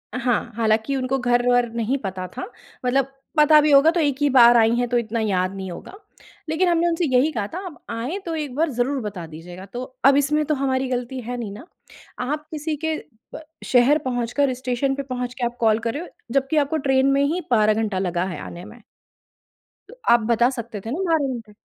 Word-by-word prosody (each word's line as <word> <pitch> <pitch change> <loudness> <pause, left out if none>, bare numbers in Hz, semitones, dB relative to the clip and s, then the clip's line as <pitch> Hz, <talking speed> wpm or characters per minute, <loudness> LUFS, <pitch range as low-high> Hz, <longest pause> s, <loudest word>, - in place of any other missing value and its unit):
हाँ, 245 -1 0
हालाँकि 220 +3 +1
उनको 265 0 -1
घर-वर 245 0 +2
नहीं 235 +4 0
पता 185 -1 -4
था, - - -3 0.4
मतलब 270 +2 +1 0.2
पता 300 0 +7
भी 300 0 +2
होगा 280 +3 +7
तो 345 - -1
एक 285 -4 +1
ही 290 - +3
बार 240 -2 +7
आईं 225 0 +4
हैं 245 0 +1
तो 245 - +2
इतना 230 -1 -2
याद 190 -4 0
नहीं 190 -1 -6
होगा। 175 - -9 0.6
लेकिन 325 +4 +1
हमने 340 0 +2
उनसे 335 +1 0
यही 280 +5 +4
कहा 210 -7 -3
था, 340 - -6
"आप 345 -5 -10
आएँ 245 - -3
तो 335 -2 -3
एक 295 -5 -4
बार 320 +3 +1
ज़रूर 260 +3 -1
बता 205 -6 -6
दीजिएगा।" 175 +4 -10
तो 245 +1 -4 0.2
अब 275 0 +7
इसमें 300 +2 +2
तो 305 - 0
हमारी 265 -1 0
गलती 250 +1 -3
है 245 +1 -5
नहीं, 225 -4 -5
ना? 220 - -11 0.5
आप 300 +4 -3
किसी 310 0 -3
के 320 -1 0 0.4
प - - -7 0.2
शहर 255 +4 +4
पहुँचकर, 255 +2 0
स्टेशन 255 +2 -1
पे 280 - -4
पहुँच 250 -2 -4
के 250 - -3
आप 240 0 -3
कॉल 220 -1 +3
कर 230 0 -2
रहे 310 - -4
हो, - - -9 0.2
जब्कि 275 +3 +2
को 320 - 0
ट्रेन 270 -2 +2
में 275 +1 +3
ही 325 +6 0
12 215 -2 +4
घंटा 215 -3 -1
लगा 180 -2 -1
है 185 - -5
आने 175 +1 -8
में। 225 +2 -13 1.1
तो - - -11 0.2
आप 240 - +6
बता 235 +2 +4
सकते 235 -4 -6
थे 225 - -4
ना 305 - -3
12 290 -5 +1
घंटे। 225 -3 -9
250 Hz, 220 wpm, -22 LUFS, 230-285 Hz, 1.1 s, पता